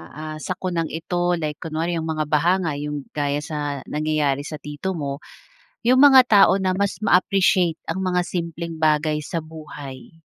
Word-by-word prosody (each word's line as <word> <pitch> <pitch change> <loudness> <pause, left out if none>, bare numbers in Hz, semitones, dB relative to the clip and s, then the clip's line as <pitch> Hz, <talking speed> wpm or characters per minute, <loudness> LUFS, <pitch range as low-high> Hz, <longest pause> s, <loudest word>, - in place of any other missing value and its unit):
ah, 155 0 -6
sakunang 175 -1 -3
ito, 175 +2 -1
like 150 -3 -4
kunwari, 165 +1 -2
yung 160 - -4
mga 155 -1 -1
baha 155 +4 +2
nga 160 -4 -1
yung 145 -1 -4
gaya 145 0 -1
sa 145 -3 -4
nangyayari 150 -2 0
sa 155 - -6
tito 150 +6 -5
mo, 140 -3 -4 0.7
yung 255 +2 +5
mga 275 -2 +9
tao 200 -4 +5
na 190 -1 0
mas 200 +2 -1
ma-appreciate 185 -3 +3
ang 190 - -3
mga 180 -1 0
simpleng 170 -2 -5
bagay 155 -1 +2
sa 155 +2 -4
buhay? 155 -1 -11
160 Hz, 160 wpm, -22 LUFS, 150-180 Hz, 0.7 s, mga